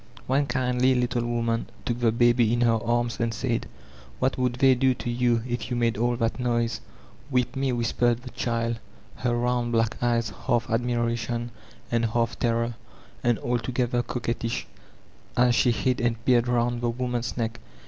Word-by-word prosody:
One 140 +2 +1
kindly 125 0 +2
little 125 -1 0
woman 115 -1 -1 0.2
took 120 0 -1
the 115 -2 +3
baby 120 0 +4
in 120 +1 +1
her 115 -2 +3
arms 120 -1 0
and 115 0 +1
said: 115 0 -2 0.5
*'What 130 0 +1
would 125 -1 0
they 135 +1 +5
do 130 0 +2
to 120 - -4
you, 120 -1 +1
if 120 +1 -3
you 125 - -1
made 115 -1 +1
all 120 +2 +1
that 115 +2 -1
noise*'' 120 -2 0 0.2
— 130 +3 -23
^"Whip 125 +1 +1
me/' 135 -1 0
whispered 120 0 +1
the 125 - -8
diikL 115 -1 -1 0.4
her 120 -1 0
round 120 0 0
black 115 -1 +1
eyes 115 -3 +1 0.2
half 120 -2 +2
admiration 120 0 -1 0.4
and 115 -1 +2
half 115 +1 0
terror, 115 0 +1 0.5
and 120 -2 +3
altogether 120 0 0
coquettish, 115 -1 -3 0.7
as 125 0 +5
she 120 - +3
hid 125 +1 +1
and 115 -1 -1
peered 120 -2 +4
round 120 0 +1
the 120 - +1
woman's 120 -1 -2
neck. 115 -1 -2
120 Hz, 170 wpm, -26 LUFS, 115-125 Hz, 0.7 s, they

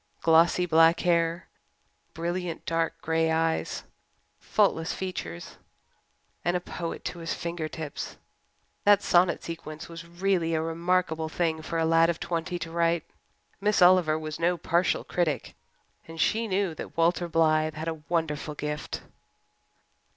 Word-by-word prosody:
Glossy 165 +2 +5
black 165 0 +5
hair, 170 0 +1 0.7
brilliant 170 0 -3
dark 165 0 -1
grey 160 0 +1
eyes, 160 0 0 0.6
faultless 180 -6 +1
features. 85 - -6 0.9
And 175 +1 +1
a - - -3
poet 170 -1 -6
to 175 - -4
his 165 0 -3
fingertips! 160 -3 -5 0.7
That 205 -1 +5
sonnet 175 -1 +3
sequence 160 -1 -7
was 165 0 -9
really 175 -1 0
a 160 - +1
remarkable 165 -1 0
thing 160 -1 -1
for 165 +1 -4
a 165 - +2
lad 165 +1 +4
of 170 - -1
twenty 175 +1 -2
to 165 -1 -6
write. 170 -1 +1 0.6
Miss 210 +1 +2
Oliver 175 -4 +5
was 155 -1 -5
no 175 +1 +2
partial 175 +1 +1
critic 170 -4 -1 0.5
and 165 0 -10
she 225 +7 +2
knew 190 -3 0
that 155 - -9
Walter 170 +1 +2
Blythe 155 -1 +2
had 155 +1 -5
a 160 -2 -4
wonderful 155 -3 -1
gift. 150 +1 -4
165 Hz, 135 wpm, -27 LUFS, 160-175 Hz, 0.9 s, Glossy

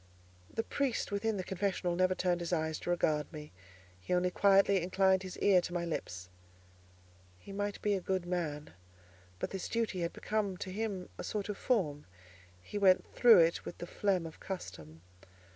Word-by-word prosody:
The 225 - -2
priest 265 -6 -1
within 205 +1 0
the 185 - -2
confessional 185 -2 -1
never 185 +1 +2
turned 180 -1 +1
his 170 0 -4
eyes 160 -2 0
to - - -6
regard 155 -4 +1
me; 150 -2 -9 0.5
he 135 - -1
only 180 0 +1
quietly 195 0 +4
inclined 190 +1 +3
his 185 -1 -7
ear 190 -3 +5
to 175 - -6
my 170 -1 -1
lips. 90 - -4 1.1
He 90 - -12
might 205 +1 -3
be 210 - +2
a 195 - -1
good 185 -1 -1
man, 160 -5 -3 0.6
but - - -4
this 190 -2 -4
duty 225 -5 -1
had 170 0 -1
become 205 -3 -2
to 185 - -5
him 200 -2 -3
a - - -4
sort 210 -1 -3
of 205 - -3
form: 155 - 0 0.6
he 205 - -5
went 190 -2 +4
through 235 -7 +8
it 165 +1 +2
with - - -7
the - - -6
phlegm 185 -1 0
of 160 - -9
custom. 80 - -7
185 Hz, 180 wpm, -33 LUFS, 170-200 Hz, 1.1 s, through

